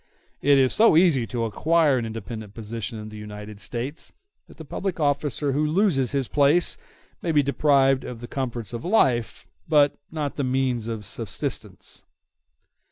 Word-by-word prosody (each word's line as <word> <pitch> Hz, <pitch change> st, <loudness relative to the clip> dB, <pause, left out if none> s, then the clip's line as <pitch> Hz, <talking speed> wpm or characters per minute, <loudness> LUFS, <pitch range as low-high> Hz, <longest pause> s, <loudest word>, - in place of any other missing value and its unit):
It 140 Hz, 0 st, +5 dB
is 130 Hz, -1 st, +4 dB
so 220 Hz, -7 st, +5 dB
easy 155 Hz, -10 st, +4 dB
to 115 Hz, +2 st, -2 dB
acquire 150 Hz, +4 st, +2 dB
an 115 Hz, -, -3 dB
independent 110 Hz, -1 st, -7 dB
position 115 Hz, +1 st, -5 dB
in 105 Hz, 0 st, -7 dB
the 110 Hz, -, -10 dB
United 105 Hz, 0 st, -9 dB
States 125 Hz, +8 st, -4 dB, 0.4 s
that -, -, -17 dB
the -, -, -9 dB
public 190 Hz, -3 st, -4 dB
officer 145 Hz, -1 st, 0 dB
who 145 Hz, +3 st, 0 dB
loses 155 Hz, -, +2 dB
his 135 Hz, -3 st, -1 dB
place 150 Hz, +4 st, +3 dB, 0.5 s
may 170 Hz, -, -1 dB
be 150 Hz, -2 st, +4 dB
deprived 135 Hz, -1 st, +3 dB
of 120 Hz, -2 st, -7 dB
the 120 Hz, -, -8 dB
comforts 120 Hz, -5 st, -4 dB
of 120 Hz, -, -5 dB
life, 135 Hz, -, +1 dB, 0.2 s
but 145 Hz, -3 st, +4 dB
not 150 Hz, -3 st, -3 dB
of -, -, -28 dB
the 145 Hz, -, 0 dB
means 130 Hz, -3 st, 0 dB
of 110 Hz, -3 st, -5 dB
subsistence. 105 Hz, -1 st, -5 dB
130 Hz, 165 wpm, -24 LUFS, 115-150 Hz, 0.5 s, It